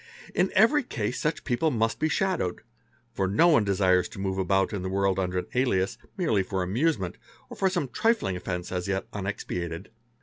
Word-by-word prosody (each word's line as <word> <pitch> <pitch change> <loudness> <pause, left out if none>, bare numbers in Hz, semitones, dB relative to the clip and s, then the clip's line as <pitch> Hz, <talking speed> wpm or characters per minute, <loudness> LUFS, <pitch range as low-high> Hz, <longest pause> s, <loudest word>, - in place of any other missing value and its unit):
In 185 - +2
every 230 +9 +5
case 120 - -3
such 150 0 -1
people 130 +6 +1
must 115 -4 0
be 155 - +1
shadowed; 180 - -1 0.5
for 95 - 0
no 110 - +4
one 145 -9 +5
desires 95 -2 +2
to - - -10
move 95 -1 -2
about 95 +1 +1
in 100 - -2
the 95 - -3
world 95 0 +1
under 90 -1 -1
an 90 - -1
alias 110 -7 +1 0.2
merely 115 - +2
for 95 0 -2
amusement 100 - 0 0.3
or - - -6
for 190 - +2
some 145 -6 -1
trifling 225 - +1
offence 90 -1 -4
as 90 0 -2
yet 95 0 -1
unexpiated. 90 -4 -4
100 Hz, 190 wpm, -27 LUFS, 95-150 Hz, 0.5 s, every